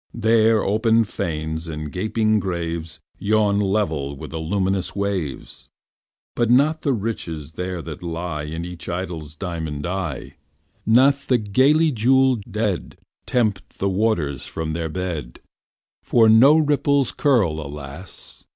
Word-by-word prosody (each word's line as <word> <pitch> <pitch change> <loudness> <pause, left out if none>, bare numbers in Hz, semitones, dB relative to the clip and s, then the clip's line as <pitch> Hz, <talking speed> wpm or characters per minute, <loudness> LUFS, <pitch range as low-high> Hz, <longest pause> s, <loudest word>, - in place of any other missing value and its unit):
There 110 -1 +3
open 110 +2 +3
fanes 80 -5 -4
and 75 -2 -5
gaping 110 +3 +1
graves 85 -4 -3 0.2
Yawn 105 -1 +2
level 85 -9 0
with 70 - -9
the 80 - -4
luminous 95 +2 -1
waves, 100 -7 -4 0.7
But 120 -1 +1
not 150 +6 +3
the 140 - +1
riches 90 - -4
there 90 0 -4
that 80 -2 -8
lie 85 -3 -4
Within 80 +3 -5
each 90 -1 -7
idol's 85 -4 -5
diamond 80 -4 -4
eye, 90 -7 -4 0.5
Not 130 +5 +6
the 125 - +4
gaily 135 +9 +3
jeweled 130 0 +3
dead 105 -4 -2 0.3
Tempt 110 -6 -1
the 100 - 0
waters 95 - 0
from 80 -1 -4
their 80 0 -3
bed, 80 -8 -5 0.6
For 115 -2 +4
no 125 +8 +7
ripples 140 -3 +2
curl, 105 - +2
alas! 75 +4 -10
95 Hz, 130 wpm, -22 LUFS, 80-115 Hz, 0.7 s, no